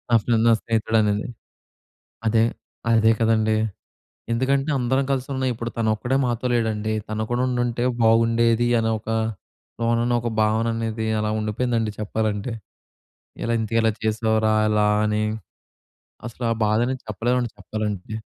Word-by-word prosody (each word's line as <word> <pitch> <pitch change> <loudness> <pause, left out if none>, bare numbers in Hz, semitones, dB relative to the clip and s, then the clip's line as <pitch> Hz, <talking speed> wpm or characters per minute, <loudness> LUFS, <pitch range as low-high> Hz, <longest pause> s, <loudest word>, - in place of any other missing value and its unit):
Afternoon 115 +1 +2
నా 115 - +6
స్నేహితుడనేది. 110 -2 +1 1.0
అదే. 110 0 +4 0.5
అదే. 110 -1 +5
కదండీ! 110 -1 +3 0.8
ఎందుకంటే, 135 +4 +1
అందరం 130 +2 +1
కలిసున్నాం 130 0 -1
ఇప్పుడు 120 +1 -5
తనొక్కడే 115 +3 0
మాతో 120 +1 -2
లేడండి. 110 -2 0
తను 110 0 -2
కూడా 120 +1 +1
ఉండుంటే 120 -1 -1 0.2
బాగుండేది 115 +1 +3
అని 110 0 0
ఒక 110 - -13 0.7
లోనన 115 +1 +1
ఒక 120 - -2
భావననేది 110 0 0
అలా 105 0 -1
ఉండిపోయిందండి 115 +1 -1
చెప్పాలంటే. 105 +1 -2 0.9
ఇలా 115 - 0
ఇంతకి 110 +1 0
ఎలా 110 -1 +3
చేశావురా, 110 0 +1 0.2
ఇలా 105 0 +3 0.2
అని 105 0 0 1.0
అసలు 120 +1 -7
ఆ - - +3
బాధని 115 +5 +1
చెప్పలేమండి 120 +3 -1
చెప్పాలంటే. 105 0 -4
115 Hz, 120 wpm, -23 LUFS, 110-120 Hz, 1.0 s, నా